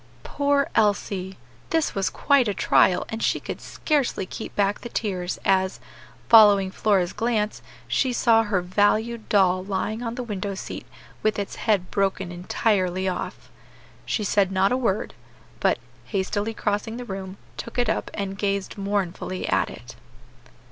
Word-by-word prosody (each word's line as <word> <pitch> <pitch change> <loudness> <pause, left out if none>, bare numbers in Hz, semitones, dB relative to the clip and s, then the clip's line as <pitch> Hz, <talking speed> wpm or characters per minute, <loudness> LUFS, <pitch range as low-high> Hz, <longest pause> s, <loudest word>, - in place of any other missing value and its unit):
Poor 285 -1 +1
Elsie! 200 -3 0 0.3
this 325 -1 +1
was 195 -1 0
quite 280 -4 +3
a 205 - -1
trial, 180 - +3
and 225 0 -4
she - - +1
could - - -6
scarcely 285 - -1
keep 220 - -7
back 200 0 +1
the 240 - -7
tears 185 -6 -2
as, 190 -1 +2 0.5
following 205 -4 +7
Flora's 190 -4 +1
glance, 215 -1 -1 0.3
she 260 - +1
saw 230 -2 +4
her 205 -4 0
valued 215 +5 +1
doll 185 -2 +3
lying 205 +3 -2
on 230 -1 -3
the 250 - -4
window 200 -3 -4
seat - - -7 0.3
with 215 0 +1
its 200 -1 -3
head 200 -5 0
broken 195 -2 0
entirely 185 +1 0
off. 185 - -4 0.5
She 215 - -1
said 200 -1 +2
not 190 +1 +2
a - - +3
word, 225 -6 -1 0.5
but, - - +2 0.3
hastily 205 +2 -2
crossing 210 +2 -2
the 245 - -6
room, 190 -2 -6 0.2
took 235 - -7
it 245 -1 +2
up 220 - -1
and 195 -1 -4
gazed 200 0 -2
mournfully 195 -2 -2
at - - +2
it. 120 +2 -11
205 Hz, 155 wpm, -24 LUFS, 190-225 Hz, 0.5 s, following